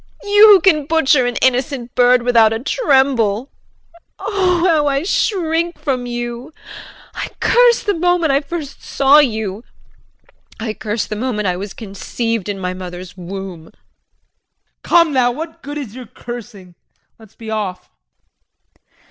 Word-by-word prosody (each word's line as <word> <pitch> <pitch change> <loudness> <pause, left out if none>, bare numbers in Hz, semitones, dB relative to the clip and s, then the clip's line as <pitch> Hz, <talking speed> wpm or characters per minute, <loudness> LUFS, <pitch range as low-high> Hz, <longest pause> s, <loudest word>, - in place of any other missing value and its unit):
You 415 +1 +6
who 405 -4 +7
can 305 -7 +2
butcher 290 -5 +3
an 245 - -3
innocent 255 -1 0
bird 245 0 +4
without 230 -3 +4
a 225 - -1
tremble. 265 - +1 0.7
Oh, 370 -4 0
how 310 -4 +2
I 275 +1 0
shrink 340 -3 -1
from 255 -4 -3
you. 240 +4 -6 0.6
I - - -5
curse 485 -1 +4
the 410 - 0
moment 350 -2 +1
I 275 +1 +2
first 295 -1 -7
saw 275 +2 +4
you. 220 -6 -1 1.0
I 220 -1 -3
curse 215 0 -3
the 215 - -5
moment 210 -3 -2
I 180 - 0
was 195 +2 -7
conceived 225 0 -4
in 200 - -3
my 185 -1 -3
mother's 180 0 -9
womb. 185 -2 -8
JEAN. - - -19 1.1
Come 335 -3 +3
now! 250 -2 +2
What 320 +5 -8
good 290 +2 -7
is 260 -8 -7
your 250 -1 -10
cursing, 220 -7 -10 0.5
let's 220 -2 -18
be 220 -1 -8
off. 205 -4 -4
250 Hz, 145 wpm, -17 LUFS, 215-315 Hz, 1.1 s, who